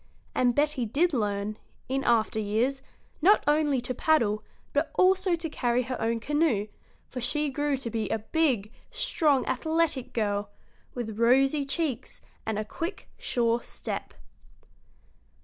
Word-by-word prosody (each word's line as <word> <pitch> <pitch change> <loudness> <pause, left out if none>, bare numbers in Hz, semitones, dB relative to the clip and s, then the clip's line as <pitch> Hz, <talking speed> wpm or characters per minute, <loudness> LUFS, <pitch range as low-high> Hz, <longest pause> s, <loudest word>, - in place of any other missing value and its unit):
And 245 -1 +2
Betty 295 -3 +2
did 320 +9 +2
learn, 210 -2 -1 0.3
in 270 +1 -1
after 225 -3 +2
years, 230 +6 0 0.4
not 400 +6 +5
only 295 -2 +3
to 245 +1 -3
paddle, 230 -7 +2 0.3
but - - +1
also 370 -1 +4
to 330 0 -4
carry 245 -4 0
her 255 +1 -4
own 230 +1 0
canoe, 280 -6 +1 0.4
for 250 - -6
she 300 +4 0
grew 290 0 0
to 240 -3 -5
be 220 -3 -2
a - - +1
big, 230 -3 0 0.2
strong, 290 -5 +1
athletic 310 0 0
girl, 205 -2 -1 0.5
with 225 -3 -4
rosy 270 +4 +4
cheeks 275 -4 -2 0.3
and 220 -2 -1
a 215 - -2
quick, 330 - -5
sure 235 -1 0
step. - - -6
255 Hz, 140 wpm, -28 LUFS, 225-300 Hz, 0.5 s, not